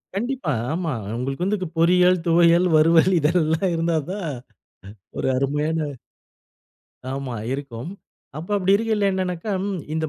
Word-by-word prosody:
கண்டிப்பா. 240 - -2 0.2
ஆமா, 165 -2 -2 0.2
உங்களுக்கு 135 +6 -3
வந்து 210 +2 0
இது 185 - -3
பொறியல், 180 +2 +4
துவையல், 170 +1 +4
வறுவல் 165 +3 +5
இதெல்லாம் 160 +3 +1
இருந்தா 165 0 0
தான் 200 0 -4
அ - - -4 0.8
ஒரு - - -1
அருமையான 150 +4 0 1.4
ஆமா, 135 -3 -4 0.2
இருக்கும். 135 +1 -6 0.5
அப்ப 165 +5 -8
அப்படி 195 -1 +2
இருக்கியல 220 -1 0
என்னனாக்கா 185 +1 -3
ம் 195 -2 -3
இந்த 160 0 -1
170 Hz, 130 wpm, -22 LUFS, 155-185 Hz, 1.4 s, வறுவல்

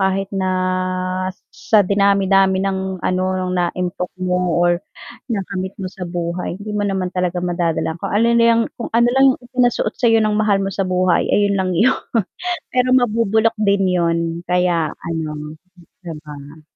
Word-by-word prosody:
kahit 190 0 0
na 190 -1 -1 1.0
sa 420 - +2
dinami-dami 195 -1 +3
ng 190 -1 -3
ano, 185 0 0
no'ng 185 -1 -2
naimpok 180 +1 -2
mo 180 -1 0
or 175 0 +3 0.5
nakamit 195 -2 -3
mo 185 - -4
sa 180 -1 -7
buhay 175 0 -3
hindi 205 +2 -7
mo 205 0 -1
naman 190 -2 -1
talaga 180 -1 -1
madadala, 170 -2 -1
kung - - -4
ano 220 +3 +3
na 230 - +4
'yang 230 0 +4 0.2
kung 235 - -4
ano 235 +1 +4
lang 270 +1 +4
'yong - - -14
ipinasuot 250 -2 +1
sa 245 - +2
'yo 225 0 +5
ng 215 0 +1
mahal 210 -2 +2
mo 195 - -2
sa 195 - -1
buhay, 185 -1 +2
ayun 205 -1 +2
lang 185 -1 0
'yon, 225 +10 +3 0.7
pero 250 0 +2
mabubulok 230 -2 +2
din 200 -2 +2
'yon 170 -2 +1 0.3
kaya 175 -3 +1
ano, 155 -2 -5 0.5
'di 170 -2 -6
ba? 145 +1 -11
190 Hz, 165 wpm, -19 LUFS, 175-210 Hz, 1.0 s, yo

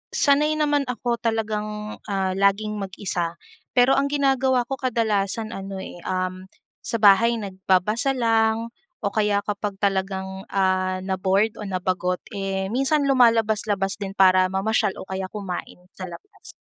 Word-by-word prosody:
sanay 300 +2 +3
naman 295 -2 +2
ako 240 -1 -2
talagang, 215 -2 -3
ah, 195 -2 0
laging 205 +2 +1
mag-isa, 185 -3 -3 0.4
pero 250 +1 +5
ang 280 - +1
ginagawa 265 -3 +2
ko 270 - -3
kadalasan 220 -3 0
ano, 195 0 -6
eh, 175 - -9
um, 185 0 -3 0.4
sa 230 - -2
bahay 225 +4 +6
nagbabasa 200 +6 0
lang 225 -1 +1 0.3
o 200 - +1
kaya 210 -2 +2
kapag 205 -1 -3
talagang, 190 -1 -2
ah, 185 -1 +1
na-bored 190 +3 +1
o 210 - -5
nabagot, 185 -1 -1 0.2
eh, 195 -1 -2
minsan 275 +4 +2
lumalabas-labas 220 -6 +2
din 195 -1 -5
para 185 -1 +5
mamasyal 210 +1 +1
o - - -6
kaya 190 0 -4
kumain 195 -4 -6 0.2
sa 185 - -6
labas. 400 - -13
205 Hz, 135 wpm, -23 LUFS, 190-230 Hz, 0.4 s, bahay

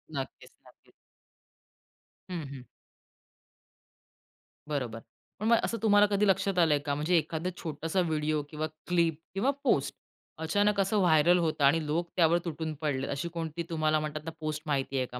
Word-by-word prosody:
नक्कीच, 135 -1 -6 0.2
नक्कीच. - - -22 1.4
हं, 175 -2 -3
हं. 135 -2 -9 2.1
बरोबर. 125 -6 -2 0.4
पण 215 - -3
मग 235 0 +6
असं 230 - -1
तुम्हाला 205 -1 +6
कधी 205 +1 +3
लक्षात 195 -1 +2
आलंय 155 -4 +4
का? 145 -1 0
म्हणजे 160 +4 +2
एखादा 165 +2 -1
छोटासा 160 +3 -2
व्हिडिओ 155 -2 0
किंवा 155 0 -3 0.2
क्लिप 170 -3 +2
किंवा 215 +8 +2
पोस्ट - - +1 0.4
अचानक 205 +6 +1
असं 195 +2 +2
व्हायरल 175 0 +5
होतं 160 -3 0
आणि 155 +3 +3
लोक 165 +3 -1
त्यावर 170 -1 +4
तुटून 160 -1 -3
पडलेत. 135 -3 -1
अशी 150 +5 -3
कोणती 165 0 -4
तुम्हाला 155 -2 +1
म्हणतात 155 0 -4
ना, 165 - -4
पोस्ट 155 -1 -3
माहिती 135 -1 -1
आहे 130 - +1
का? 125 0 -8
160 Hz, 155 wpm, -29 LUFS, 150-180 Hz, 2.1 s, मग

